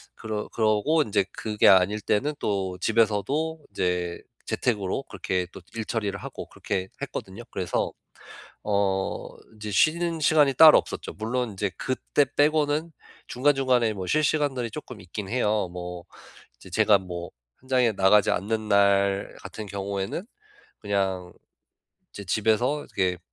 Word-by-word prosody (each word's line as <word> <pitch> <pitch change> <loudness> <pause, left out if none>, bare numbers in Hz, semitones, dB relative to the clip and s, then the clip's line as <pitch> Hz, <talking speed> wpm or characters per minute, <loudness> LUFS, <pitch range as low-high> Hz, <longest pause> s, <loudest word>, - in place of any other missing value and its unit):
그러 110 -1 -4
그러고 110 +8 +2
어 - - +5
인제 100 -4 +1
그게 105 -1 +1
아닐 95 +3 +5
때는 120 +9 0
또 95 -3 -2
집에서도 115 +10 0
인제 90 -2 -1 0.2
재택으로 110 +1 -1
그렇게 90 -1 -2
또 - - -10 0.2
일처리를 105 -3 -2
하고 - - -7
그렇게 95 -2 -3
했거든요. 100 +5 -6
그래서 90 -2 -1 0.7
어 100 -2 0 0.3
이제 105 0 -6
쉬는 165 - +2
시간이 150 -3 +4
따로 155 +3 +9
없었죠. - - -5
물론 115 +2 -2
이제 100 +1 -1
그때 135 +2 0
빼고는 150 +2 +2 0.4
중간중간에 130 -4 +2
뭐 95 -2 -5
쉴 155 +8 +2
시간들이 140 -6 0
쪼끔 125 -3 -8
있긴 95 +2 -7
해요. 105 -6 +1
뭐 90 -1 -7 0.5
이제 - - -14
제가 105 -2 +4
뭐 90 -2 -7 0.3
현장에 130 -2 +2
나가지 100 +1 +4
않는 110 +2 -1
날 100 -1 +3
같은 110 -1 -7
경우에는 100 - -4 0.6
그냥 95 -3 -2 0.8
이제 100 - -8
집에서 110 +9 +1 0.2
이렇게 90 -2 +1
105 Hz, 295 characters per minute, -26 LUFS, 95-130 Hz, 0.8 s, 따로